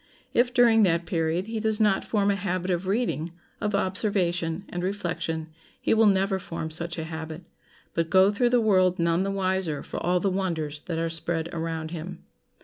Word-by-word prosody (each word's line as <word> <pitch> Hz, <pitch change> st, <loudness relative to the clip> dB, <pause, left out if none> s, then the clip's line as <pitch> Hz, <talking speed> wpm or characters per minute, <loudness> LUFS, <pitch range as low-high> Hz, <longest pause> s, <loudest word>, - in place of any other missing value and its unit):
If 245 Hz, +1 st, +3 dB
during 235 Hz, -3 st, +5 dB
that 170 Hz, -4 st, +3 dB
period 165 Hz, +1 st, 0 dB
he 225 Hz, 0 st, -3 dB
does 220 Hz, 0 st, +1 dB
not 210 Hz, -3 st, +3 dB
form 205 Hz, -2 st, +1 dB
a -, -, +1 dB
habit 185 Hz, -1 st, -2 dB
of 180 Hz, +1 st, -1 dB
reading, 190 Hz, -6 st, -1 dB, 0.3 s
of 210 Hz, -1 st, 0 dB
observation, 185 Hz, -3 st, 0 dB
and 175 Hz, -, -4 dB
reflection, 170 Hz, -4 st, -3 dB, 0.3 s
he -, -, +1 dB
will 225 Hz, -1 st, +5 dB
never 195 Hz, -1 st, +2 dB
form 165 Hz, -3 st, -5 dB
such 170 Hz, +2 st, -2 dB
a 160 Hz, -, -3 dB
habit, 160 Hz, +1 st, -6 dB, 0.5 s
but 165 Hz, -1 st, 0 dB
go 190 Hz, +2 st, +5 dB
through 240 Hz, +4 st, +2 dB
the 245 Hz, 0 st, +4 dB
world 185 Hz, -4 st, +3 dB
none 170 Hz, +1 st, +2 dB
the 195 Hz, -, 0 dB
wiser 190 Hz, -5 st, -1 dB
for -, -, -6 dB
all 180 Hz, +1 st, +2 dB
the 195 Hz, +2 st, 0 dB
wonders 160 Hz, -6 st, -2 dB
that 165 Hz, -2 st, -2 dB
are 165 Hz, 0 st, -1 dB
spread 165 Hz, 0 st, -2 dB
around 160 Hz, -1 st, -3 dB
him. 175 Hz, +1 st, -7 dB
180 Hz, 190 wpm, -26 LUFS, 165-200 Hz, 0.5 s, during